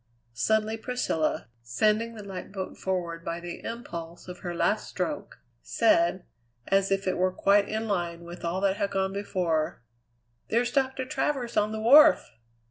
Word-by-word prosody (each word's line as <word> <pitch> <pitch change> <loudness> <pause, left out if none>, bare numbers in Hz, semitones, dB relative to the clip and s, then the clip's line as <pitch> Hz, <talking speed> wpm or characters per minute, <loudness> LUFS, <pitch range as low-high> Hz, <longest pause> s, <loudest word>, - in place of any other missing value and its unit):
Suddenly 220 - +1
Priscilla, 225 - -1
sending 215 - +1
the 210 - -8
light 195 -2 -7
boat 190 -2 -5
forward 170 -3 -3
by 170 0 -3
the 175 0 -8
impulse 170 -8 -7
of 180 0 -8
her 175 -1 -5
last - - 0
stroke, - - -4 0.2
said, 330 - +2 0.4
as 195 0 +2
if 195 0 0
it 185 -1 0
were 185 0 +3
quite 200 +2 +3
in 220 +1 -2
line 175 -4 -2
with 175 +1 -10
all 175 +3 -1
that 195 0 +2
had 200 - 0
gone 190 -1 -1
before: 175 - -1 0.7
"There's 240 +2 +1
Doctor 265 0 0
Travers 265 -3 -2
on 210 +1 +2
the 220 - -3
wharf!" 275 +8 +7
195 Hz, 160 wpm, -27 LUFS, 175-225 Hz, 0.7 s, wharf